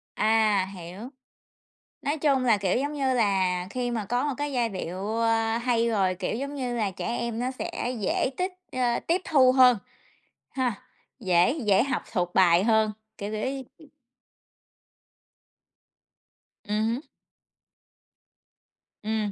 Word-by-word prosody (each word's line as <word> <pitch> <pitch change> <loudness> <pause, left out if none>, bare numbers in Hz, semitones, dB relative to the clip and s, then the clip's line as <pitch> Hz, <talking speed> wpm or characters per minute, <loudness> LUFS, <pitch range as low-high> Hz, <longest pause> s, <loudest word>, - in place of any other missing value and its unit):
À, 215 -3 +3
hiểu. 175 +2 -9 1.0
Nói 295 +2 -1
chung 275 -3 +2
là, 225 -4 +4
kiểu, 190 0 0
giống 285 +2 -2
như 270 -3 0
là, 190 -5 +1
khi 245 +1 -2
mà 225 -3 -2
có 245 +7 0
một 275 - -2
cái 290 +1 -3
giai 240 -2 +1
điệu, 195 +3 -4
a, 225 0 +1
hay 235 -1 +1
rồi, 195 -4 +1
kiểu, 185 - -3
giống 280 +3 -4
như 250 -3 -3
là, 210 -4 0
trẻ 185 - -6
em 235 -1 -2
nó 250 +1 -1
sẽ 260 -3 -4
dễ 210 +6 0
tích, 365 +1 -1 0.2
a, 245 -2 0
tiếp 345 +2 0
thu 260 -4 +5
hơn 250 -4 +6 0.7
ha, 255 -4 -1 0.5
dễ 180 0 +3
dễ 200 +1 +4
học 270 -1 -2
thuộc 180 -4 -1
bài 180 -1 +5
hơn, 220 -1 +3 0.3
kiểu, 205 +1 -5
kiểu 215 0 -3
như 270 -1 -5
ừm. 315 -3 -17 2.8
Ừm 215 +1 +1
hứm. 235 +6 -1 2.0
Ừm. 215 -1 -1
230 Hz, 145 wpm, -26 LUFS, 200-255 Hz, 2.8 s, hơn